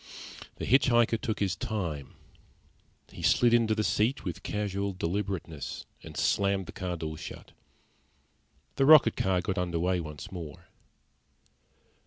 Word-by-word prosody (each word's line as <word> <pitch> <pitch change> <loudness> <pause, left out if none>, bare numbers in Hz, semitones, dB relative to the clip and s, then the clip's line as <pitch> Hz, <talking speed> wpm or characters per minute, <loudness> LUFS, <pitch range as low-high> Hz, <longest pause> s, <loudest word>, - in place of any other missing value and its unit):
The - - -5
hitch 130 +3 +4
hiker 120 -2 +4
took 110 0 -3
his 100 -2 0
time. 90 - -4 1.0
He - - -10
slid 120 -1 +4
into 115 -2 +3
the 110 - 0
seat 115 +6 +1
with 90 -3 -4
casual 100 -1 -2
deliberateness 90 -4 -4 0.2
and - - -10
slammed 100 -1 +1
the - - -8
car 90 -1 -4
door 80 -1 -5
shut. - - -9 1.3
The 135 - +3
rocket 150 -7 +8
car 95 -1 +1
got 95 +1 -2
under 90 -2 -1
way 90 +2 +1
once 75 -3 -7
more. 85 -6 -8
95 Hz, 140 wpm, -29 LUFS, 85-110 Hz, 1.3 s, rocket